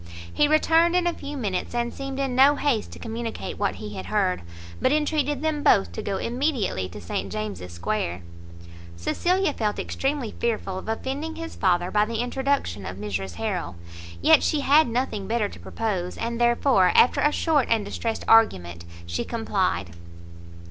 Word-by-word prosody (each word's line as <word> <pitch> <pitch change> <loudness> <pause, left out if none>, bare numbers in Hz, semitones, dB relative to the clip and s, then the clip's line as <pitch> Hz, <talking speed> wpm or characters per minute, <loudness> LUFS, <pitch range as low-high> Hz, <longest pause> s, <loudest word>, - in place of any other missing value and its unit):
He 295 - +3
returned 325 +3 +4
in 360 -1 +2
a 345 - +1
few 290 -2 -7
minutes, 205 -3 -3
and 240 0 -1
seemed 275 0 -5
in 270 -2 -1
no 275 +3 +6
haste 275 -7 0
to - - -10
communicate 230 0 -5
what 95 - 0
he 105 +1 -7
had 95 -2 -6
heard, 90 0 +1 0.4
but - - +3
entreated 295 -1 0
them 310 -2 0
both 95 - +4
to 85 - -5
go 195 -1 -2
immediately 235 - -1
to 105 - -9
St 95 +1 -4
James's 95 -3 -5
square. 85 +1 -3 0.7
Cecilia 350 - 0
felt 210 -4 -1
extremely 270 -4 -2
fearful 215 -5 -1
of 215 - -8
offending 275 +8 -3
his 330 0 -7
father 180 -1 +1
by 210 0 +3
the 230 +1 -4
introduction 245 - -1
of 90 0 -6
Mrs 95 -3 -4
Harrel; 85 +2 -3 0.5
yet - - +7
she 300 - +1
had 290 +3 +5
nothing 230 -5 -2
better 225 -2 +1
to - - -12
propose, 190 -6 -3
and 235 +1 -3
therefore, 240 -5 +4
after 250 - +5
a 295 - +4
short 300 -4 +2
and 220 -3 +2
distressed 225 +2 -3
argument, 90 - +3 0.2
she 85 0 -2
complied. 190 - -1
225 Hz, 170 wpm, -25 LUFS, -, 0.7 s, yet